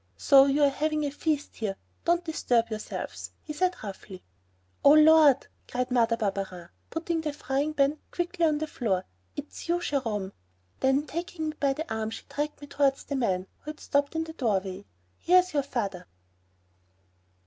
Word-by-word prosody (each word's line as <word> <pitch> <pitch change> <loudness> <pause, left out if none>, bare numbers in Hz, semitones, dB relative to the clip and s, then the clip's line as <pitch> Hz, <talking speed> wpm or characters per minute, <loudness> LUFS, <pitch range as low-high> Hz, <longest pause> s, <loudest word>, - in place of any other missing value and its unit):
"So, 275 -1 +7
you're 280 0 +3
having 305 +2 0
a 285 - -2
feast 295 0 -2
here, 205 -4 -2 0.3
don't 345 +1 +2
disturb 240 -8 +1
yourselves," 215 0 -5
he 300 - -6
said 365 +4 +1
roughly. 195 -2 -8 0.6
"Oh, 285 - +8
Lord!" 305 -3 +7 0.2
cried 250 0 -2
Mother 230 -2 +3
Barberin, 195 -5 -3 0.2
putting 330 0 -2
the 310 -1 -2
frying 285 +1 -2
pan 280 +1 +2
quickly 345 -1 -1
on 305 -1 +1
the 310 - -2
floor, 215 -11 -1 0.3
"is 290 - -3
it - - -10
you, 345 +1 +2
Jerome." 225 - -2 0.5
Then, 270 +2 +2
taking 325 0 -4
me 305 - -6
by 275 -1 +2
the 315 -2 -4
arm 220 0 -2
she 225 - -7
dragged 295 0 -4
me - - -7
towards 280 -1 +1
the 285 - -4
man 190 -8 0
who 300 - -9
had 305 - -7
stopped 285 +1 0
in 320 - 0
the 320 0 -8
doorway. 200 - -1 0.3
"Here's 365 0 +4
your 290 - +2
father." 200 -10 -4
280 Hz, 170 wpm, -28 LUFS, 225-310 Hz, 0.6 s, Oh